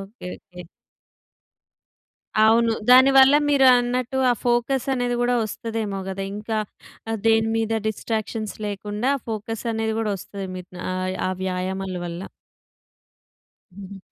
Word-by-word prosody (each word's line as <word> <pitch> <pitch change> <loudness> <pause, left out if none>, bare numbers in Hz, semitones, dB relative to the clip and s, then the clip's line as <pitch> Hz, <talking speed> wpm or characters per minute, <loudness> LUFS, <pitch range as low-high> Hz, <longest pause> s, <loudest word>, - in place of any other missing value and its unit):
Okay. 195 0 -10
Okay. 180 -2 -13 1.8
అవును. 230 +1 +4 0.2
దానివల్ల 265 +2 +7
మీరన్నట్టు, 255 -2 +3
ఆ - - +5
ఫోకస్ 240 +2 +1
అనేది 245 -1 -1
కూడా 245 0 +2
వస్తదేమో 215 -2 -4
కదా! 190 0 -4
ఇంకా 215 +1 -3 0.5
ఆహ్, 225 - -1
దేని 225 0 +4
మీద 225 0 -1 0.2
డిస్ట్రాక్షన్స్ 220 0 -3
లేకుండా, 210 +5 -2 0.2
ఫోకస్ 220 +1 -4
అనేది 220 0 -1
కూడా 220 -2 -1
వస్తది. 195 +1 -7
మీకు 180 0 -10 0.2
ఆహ్, 185 0 -2
ఆ - - 0
వ్యాయామాల 190 0 -3
వల్ల. 175 +2 -6 1.5
హుహు. 195 0 -10
220 Hz, 115 wpm, -23 LUFS, 195-245 Hz, 1.8 s, దానివల్ల